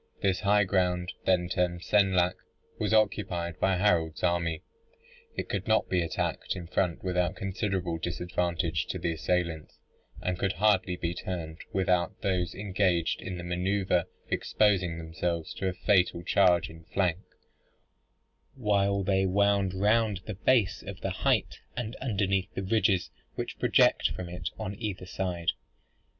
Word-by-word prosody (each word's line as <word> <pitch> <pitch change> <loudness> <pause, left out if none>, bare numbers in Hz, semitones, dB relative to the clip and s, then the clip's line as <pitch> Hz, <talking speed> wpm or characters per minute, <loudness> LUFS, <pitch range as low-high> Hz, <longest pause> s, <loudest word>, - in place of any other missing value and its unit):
This 95 -2 +2
high 105 0 +4
ground, 90 -2 0
then 90 -2 +3
termed 90 -1 -1
Senlac, 95 -3 +3 0.5
was - - 0
occupied 90 -6 +1
by 95 -1 +2
Harold's 85 -5 +1
army. 85 -2 0 0.7
It - - -3
could 100 +1 -3
not 110 0 +2
be 90 -1 +2
attacked 85 +3 -2
in 90 -2 -6
front 90 0 -1
without 90 -1 0
considerable 95 -3 -2
disadvantage 85 -1 -1
to - - -3
the 85 - -1
assailants, 85 -1 -2 0.4
and 90 0 -2
could 95 -1 +1
hardly 100 -3 +2
be 85 -1 -2
turned 85 -3 -5
without 90 -2 +1
those 90 -3 0
engaged 95 -4 0
in 90 -1 -5
the 90 - -6
manoeuvre 90 0 0 0.2
exposing 95 -5 +1
themselves 80 0 -3
to 95 - -3
a 95 - 0
fatal 90 -2 +2
charge 90 -2 +4
in 80 +1 -13
flank, 90 -1 0 1.4
while 100 -4 +1
they 95 0 +2
wound 100 0 +2
round 105 0 +2
the 110 - -4
base 105 0 +2
of 100 -2 -8
the 95 - -2
height, 95 - 0 0.2
and 120 0 -3
underneath 100 -5 0
the 95 - -2
ridges 95 -3 +2 0.2
which - - -5
project - - +4
from 90 -1 -6
it 90 -1 -4
on 95 - -4
either 100 -5 -4
side. 90 -2 -1
90 Hz, 145 wpm, -29 LUFS, 85-100 Hz, 1.4 s, high